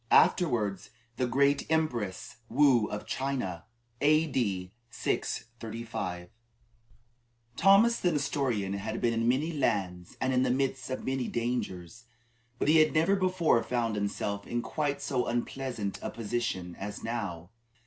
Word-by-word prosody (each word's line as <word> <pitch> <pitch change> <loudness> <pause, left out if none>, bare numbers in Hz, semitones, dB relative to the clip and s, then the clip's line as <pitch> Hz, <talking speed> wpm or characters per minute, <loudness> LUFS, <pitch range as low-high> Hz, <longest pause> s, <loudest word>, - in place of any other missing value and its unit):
(Afterwards 110 - +3 0.3
the 125 - +1
Great 140 +3 +2
Empress 120 -15 -1
Woo 130 -4 +4
of 105 - -5
China.) 125 -11 -3 0.4
A.D. 130 - +2 0.2
635. 115 -7 -4 1.3
Thomas 200 - +5
the 180 - +2
Nestorian 135 - 0
had 110 +3 -3
been 120 -1 +1
in 115 0 0
many 145 +7 +1
lands 90 - -1
and 130 0 0
in 125 - +3
the - - +2
midst 130 -1 0
of 130 - -4
many 130 -1 -1
dangers, 115 -3 -3 0.5
but - - -1
he 155 +2 +6
had 155 0 +4
never 165 +5 +4
before 185 -9 +2
found 120 -2 -1
himself 100 0 -2
in 120 0 -2
quite 145 -2 -2
so 125 -3 0
unpleasant 120 -3 -3
a - - -3
position 110 -6 -3
as 105 +1 -6
now. 100 -7 -4
120 Hz, 130 wpm, -30 LUFS, 105-140 Hz, 1.3 s, he